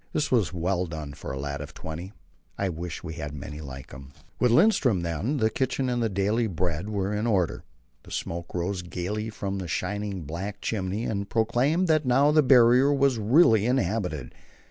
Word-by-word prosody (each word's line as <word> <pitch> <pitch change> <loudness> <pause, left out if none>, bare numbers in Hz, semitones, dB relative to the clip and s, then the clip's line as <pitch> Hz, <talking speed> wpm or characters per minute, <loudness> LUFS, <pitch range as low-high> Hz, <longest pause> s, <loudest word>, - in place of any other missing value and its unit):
This 150 -1 0
was 115 -7 +2
well 90 +1 -1
done 80 -3 -6
for - - -7
a 70 - -4
lad 70 +1 -4
of 70 - -9
twenty. 85 +4 -6 0.5
I 100 - 0
wish 85 0 -6
we 80 -2 -5
had 75 -2 -6
many 75 +2 -7
like 65 -2 -9
him. 65 +1 -11 0.3
With 125 - +4
Lindström, 125 - +4
then, 90 - -1
the 110 -3 +2
kitchen 130 +2 -1
and 120 -1 0
the 115 - +1
daily 105 +4 +1
bread 90 0 -2
were 100 -1 -1
in 105 +3 -1
order. 95 -7 +1 0.4
The - - -16
smoke 85 +1 -5
rose 90 +2 -1
gaily 90 +5 -4
from 100 -2 -4
the 90 - -5
shining 100 +3 -3
black 95 +7 -5
chimney, 100 0 -2
and 100 -2 -3
proclaimed 125 +10 +2
that 155 -1 +3
now 135 +3 +4
the 155 0 +5
Barrier 125 0 +6
was 140 -4 +2
really 110 - +5
inhabited. 95 - -1
100 Hz, 190 wpm, -26 LUFS, 85-120 Hz, 0.5 s, Barrier